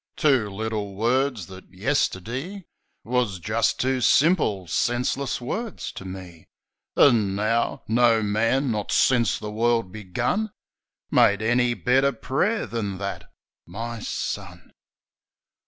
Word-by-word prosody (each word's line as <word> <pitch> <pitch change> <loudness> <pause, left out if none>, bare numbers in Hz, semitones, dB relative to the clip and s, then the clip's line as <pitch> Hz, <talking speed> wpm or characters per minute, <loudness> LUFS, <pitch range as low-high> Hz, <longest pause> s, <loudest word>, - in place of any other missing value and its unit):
Two 135 -9 +3
little 105 -1 -4
words, 120 0 0
that, 95 0 -13
yesterdee, 130 - -2 0.4
Wus 120 -5 0
jist 110 +6 0
two 130 0 0
simple, 135 - +3
senseless 125 +8 -1
words 215 - -4
to 95 - -9
me; 90 -3 -9 0.5
An' 110 -8 +4
now 110 +3 0
— - - -39
no 115 -1 +3
man, 115 +6 +1
not 105 -2 -3
since 120 -3 +3
the 105 -1 -6
world 115 -2 +1
begun, 120 - -2 0.6
Made 100 +1 +4
any 120 +1 +2
better 130 +8 +2
pray'r 155 - -1
than 105 -4 -4
that.... 95 -4 -6 0.4
My 115 +6 -6
son! - - -5
115 Hz, 120 wpm, -24 LUFS, 100-125 Hz, 0.6 s, An